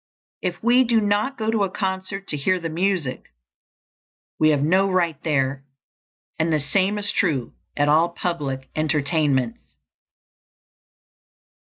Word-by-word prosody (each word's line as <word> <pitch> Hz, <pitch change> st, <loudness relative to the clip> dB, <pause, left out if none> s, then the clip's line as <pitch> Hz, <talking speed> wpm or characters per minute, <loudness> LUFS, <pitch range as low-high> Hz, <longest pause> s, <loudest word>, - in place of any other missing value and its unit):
If 180 Hz, 0 st, -3 dB
we 245 Hz, +2 st, +5 dB
do 235 Hz, -2 st, +2 dB
not 210 Hz, +6 st, 0 dB
go 220 Hz, -1 st, -1 dB
to 220 Hz, -3 st, +1 dB
a 195 Hz, -, 0 dB
concert 190 Hz, +1 st, -3 dB
to -, -, 0 dB
hear 185 Hz, +6 st, +1 dB
the 165 Hz, -1 st, -4 dB
music, 170 Hz, -5 st, -1 dB, 1.1 s
we 155 Hz, -, +5 dB
have 145 Hz, -2 st, +2 dB
no 190 Hz, +5 st, +3 dB
right 170 Hz, -6 st, 0 dB
there; 135 Hz, -3 st, 0 dB, 0.8 s
and 160 Hz, +1 st, +1 dB
the 155 Hz, -, +2 dB
same 190 Hz, +8 st, +1 dB
is 205 Hz, 0 st, 0 dB
true 140 Hz, -10 st, 0 dB, 0.2 s
at 145 Hz, 0 st, +2 dB
all 160 Hz, +3 st, +4 dB
public 145 Hz, -7 st, -3 dB
entertainments. 145 Hz, -5 st, 0 dB
170 Hz, 135 wpm, -23 LUFS, 145-195 Hz, 1.1 s, we